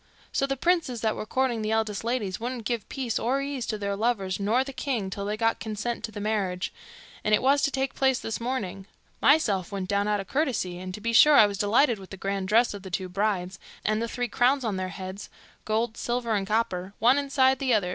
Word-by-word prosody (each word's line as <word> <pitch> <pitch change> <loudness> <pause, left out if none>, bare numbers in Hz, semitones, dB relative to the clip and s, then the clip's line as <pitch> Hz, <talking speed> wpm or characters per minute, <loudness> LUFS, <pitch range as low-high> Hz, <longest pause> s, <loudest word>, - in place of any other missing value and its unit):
So 275 - +1
the 275 0 -2
princes 315 -7 +1
that 220 -1 +1
were 215 - -5
courting 255 -3 0
the 215 - -2
eldest 220 -2 0
ladies 225 -6 -2
wouldn't 240 -1 -4
give 230 -2 -2
peace 255 -5 -2
or 255 +4 +1
ease 275 -3 -3
to 215 - -2
their 200 -1 -2
lovers 200 -4 0
nor 220 +6 +2
the 275 0 -8
king 235 -9 -2
till 200 0 -4
they 210 +1 -2
got 225 0 +1
consent 220 +2 -4
to 220 - -9
the 210 - -7
marriage, 200 -4 -1 0.5
and 215 0 +4
it - - -1
was 280 +2 +4
to - - +2
take 270 -1 -2
place 265 -1 +2
this 225 0 -4
morning. 200 -6 -3 0.3
Myself 220 - +3
went 190 -2 -4
down 200 0 +1
out 210 -1 +1
o' 195 - -5
curiousity, 240 - -1
and 185 0 -6
to 210 - -10
be 230 +2 -1
sure 300 +6 +8
I 220 - +9
was 200 -1 -3
delighted 225 +2 +3
with 190 - -12
the 195 - -8
grand 195 0 -2
dresses 225 +3 +4
of 200 - -7
the 190 - -9
two 185 0 -3
brides, 195 -1 -1 0.3
and 215 +1 +1
the 230 - -1
three 245 +1 -2
crowns 250 +5 +2
on 215 -5 -1
their 185 0 -2
heads 190 +1 -7 0.4
gold, 220 +1 -1
silver, 240 -1 -1
and 195 -2 0
copper, 200 -3 -1
one 250 +6 +4
inside 265 -2 +2
the 255 -4 +2
other. 190 -4 +1
220 Hz, 235 wpm, -27 LUFS, 200-250 Hz, 0.5 s, I